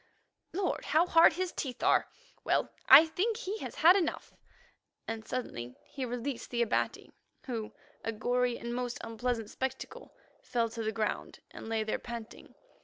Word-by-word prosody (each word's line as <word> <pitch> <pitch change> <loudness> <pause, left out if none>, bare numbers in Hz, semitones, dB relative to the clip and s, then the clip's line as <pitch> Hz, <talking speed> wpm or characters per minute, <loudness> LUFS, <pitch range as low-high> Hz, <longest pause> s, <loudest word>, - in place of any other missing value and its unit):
Lord, 375 +1 -1
how 320 +3 +4
hard 330 -2 +6
his 365 +2 -2
teeth 260 -2 -5
are. - - +4 0.4
Well, - - +1 0.2
I 285 +5 +11
think 405 +8 -1
he 435 -2 -4
has - - -6
had 340 +4 +7
enough," 360 -5 -1 0.7
and 225 -1 -5
suddenly 125 - -4
he 270 -2 -5
released 245 +1 -4
the 240 -1 +1
Abati, 230 - -1 0.3
who, 225 -4 -4 0.3
a 225 - -1
gory 245 +2 0
and 235 0 -5
most 245 0 -2
unpleasant 230 -1 -2
spectacle, 265 0 -5 0.3
fell 235 -2 0
to 230 0 -6
the 220 0 -1
ground 220 -1 -2
and - - -9
lay 225 -1 0
there 215 - -2
panting. 235 -2 -9
245 Hz, 160 wpm, -31 LUFS, 225-310 Hz, 0.7 s, I